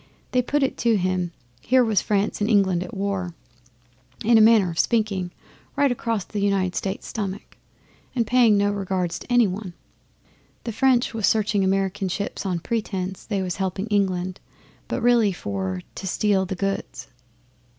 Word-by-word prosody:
They 250 - +3
put 285 +3 0
it 265 - -1
to 230 -2 +3
him, 185 -2 -1 0.3
here 255 - +3
was 215 -5 +2
France 205 0 0
and 210 - +1
England 190 -5 +3
at 180 - -9
war, 195 -3 -2 0.9
in 235 +1 +5
a 220 - +7
manner 215 -5 +5
of 165 - -5
speaking, 210 -6 +1 0.5
right 285 -1 +3
across 230 -4 -1
the 210 - -5
United 195 -2 +1
States' 195 0 -3
stomach, 200 -2 -5 0.6
and 235 -2 +1
paying 235 -2 +4
no 205 0 +2
regards 190 -3 -2
to - - -11
any 245 -1 +5
one. 190 -2 -5 0.9
The 230 - -3
French 245 +2 +2
was 220 -3 +1
searching 210 -2 +2
American 190 0 0
ships 200 +1 -3
on 175 -3 -1
pretence 195 -4 -3
they 200 -3 -1
was 180 -2 -3
helping 190 +1 -2
England, 185 -3 0 0.5
but 250 - -3
really 235 -4 +4
for 95 - -4
to 190 - -6
steal 190 0 +1
the 190 - -3
goods. 195 -9 -3
200 Hz, 165 wpm, -24 LUFS, 185-220 Hz, 0.9 s, a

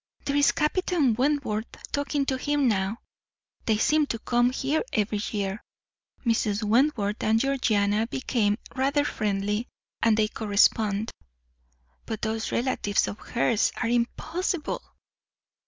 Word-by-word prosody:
There 280 - -1
is 285 0 +5
Captain 305 -4 +1
Wentworth 250 -4 0 0.2
talking 285 0 0
to 270 - 0
him 290 0 +1
now; 200 0 0 0.7
they 220 -2 +3
seem 300 +6 +3
to 230 - -2
come 240 +2 +2
here 270 +4 0
every 210 -2 0
year. 200 -1 -3 0.6
Mrs. 220 -2 +1
Wentworth 215 -2 +2
and 220 +1 +3
Georgiana 225 -5 +1
became 225 -5 0 0.2
rather 280 +2 +1
friendly, 210 0 -1 0.3
and 225 -2 +4
they 215 -1 +3
correspond. 210 0 +2 1.0
But 220 -1 -5
those 220 0 -2
relatives 235 -5 0
of 210 - -6
hers 235 -2 +1
are 230 - -1
impossible! 315 +8 -1
230 Hz, 120 wpm, -26 LUFS, 210-275 Hz, 1.0 s, is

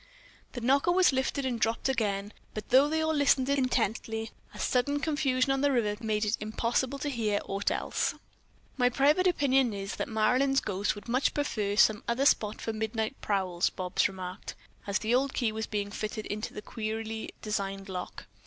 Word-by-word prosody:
The 245 - -5
knocker 275 +8 +3
was 360 -4 +4
lifted 265 +1 -1
and 245 -3 -1
dropped 225 +3 0
again, 205 -5 -1 0.2
but 215 -1 -6
though 270 +4 +6
they 315 +1 0
all 315 0 +1
listened 280 -3 +3
intently, 225 -4 0 0.2
a - - -12
sudden 285 +3 +1
confusion 275 -4 +1
on 270 0 +1
the 285 0 +3
river 220 -3 0
made 215 -1 0
it 210 +2 0
impossible 235 +5 -1
to 290 - -3
hear 215 -6 0
aught 195 +1 -1
else. - - -1 0.6
"My 250 -1 +4
private 295 +8 +3
opinion 270 -8 +3
is 195 0 -5
that - - -3
Marilyn's 250 +5 +3
ghost 200 +1 -1
would 205 - -11
much 255 +3 +1
prefer 215 -9 -1
some 215 0 +4
other 240 +4 +1
spot 215 -6 +2
for 225 - -2
midnight 220 +1 -2
prowls," 185 -4 0
Bobs 180 -1 0
remarked, 185 0 -7 0.3
as 200 - +1
the 225 +2 -1
old 270 +2 +1
key 235 -4 +1
was 220 +1 -4
being 205 -1 -3
fitted 215 +1 -4
into 215 +1 -4
the 210 - -8
queerly 220 0 -5
designed 195 -2 -3
lock. 180 -2 -6
225 Hz, 180 wpm, -29 LUFS, 210-270 Hz, 0.6 s, though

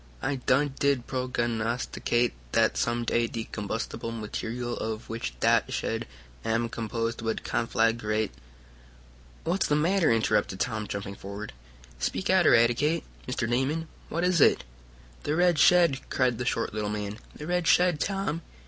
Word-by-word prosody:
"I 140 - -1
done 135 +2 +2
did 140 -4 +2
prognosticate 120 -1 -1 0.2
dat - - +3
some 120 0 0
day 115 0 +2
de 115 0 -4
combustible 110 +2 -4
material 115 +2 -4
of 110 +1 -4
which 90 - -5
dat - - +3
shed - - -2 0.4
am 115 +1 0
composed 115 +1 -3
would 115 0 -2
conflaggrate 115 -2 0 0.6
" - - -25
"What's 180 +4 +1
the 150 - +2
matter?" 170 +1 +3
interrupted 105 -4 +1
Tom, 110 -4 -1
jumping 100 0 -4
forward. 100 +2 -7 0.5
"Speak 185 - -1
out! 185 -2 +5
Eradicate! 120 +8 +4 0.2
Mr. 125 -2 -1
Damon, 135 +7 0 0.2
what 170 +2 -1
is 180 -3 +3
it?" - - +5 0.6
"The 150 - -1
red 175 -2 +3
shed!" 170 -3 +5
cried 125 -3 +1
the 125 - -2
short 115 -3 -1
little 105 -1 -2
man. 105 0 -4 0.2
"The 150 - -7
red 180 0 0
shed, 175 -3 +4
Tom!" 195 -5 -1
120 Hz, 150 wpm, -28 LUFS, 110-150 Hz, 0.6 s, out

